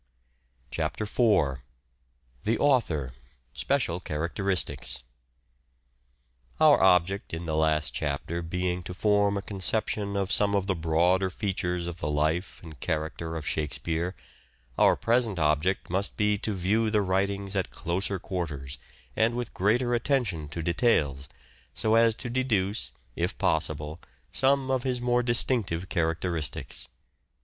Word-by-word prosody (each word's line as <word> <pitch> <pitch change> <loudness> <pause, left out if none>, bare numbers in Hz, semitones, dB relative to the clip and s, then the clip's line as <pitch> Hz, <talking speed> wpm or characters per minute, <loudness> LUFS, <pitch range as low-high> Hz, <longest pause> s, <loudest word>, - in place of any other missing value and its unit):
CHAPTER - - -2
IV 100 - +2 0.8
THE 115 +2 +1
AUTHOR 85 - +1 0.2
— 60 0 -39
SPECIAL 125 -11 0
CHARACTERISTICS 85 -1 -1 1.6
OUR 155 -2 +6
object 95 0 +3
in 85 +1 -6
the 80 -1 -2
last 80 -1 +1
chapter 80 +3 -2
being 90 +1 -2
to 90 +1 -7
form 100 0 +2
a 100 - -4
con 100 -2 -7
ception 100 0 0
of 100 0 -1
some 100 -1 +4
of 100 -1 +1
the 100 - +1
broader 85 +3 +2
features 90 -3 -2
of 85 0 -6
the 75 - -2
life 80 +5 0
and 80 -5 -11
character 80 +3 -3
of 80 -2 -5
Shakespeare, 80 +4 -2 0.6
our - - +5
present 115 -4 +1
object 80 +4 +1
must 95 +2 -1
be 105 0 +2
to 105 0 -1
view 105 +5 +1
the 105 -1 +2
writings 100 +1 -1
at 95 -2 0
closer 95 +3 -2
quarters 75 -8 -4 0.4
and 115 +2 +2
with 120 0 -4
greater 120 +6 +2
attention 115 - 0
to 80 +2 -4
details 75 - +1 0.5
so 110 - +1
as 115 -1 +5
to 125 - -4
deduce, 115 -5 0 0.2
if - - -1
possible, 75 +2 -1 0.3
some 135 0 +2
of 130 -1 +1
his 125 -1 -1
more 120 0 +2
distinctive 115 -7 +1
characteristics. 85 -2 -2
Feudalism. - - -37
95 Hz, 140 wpm, -27 LUFS, 80-110 Hz, 1.6 s, OUR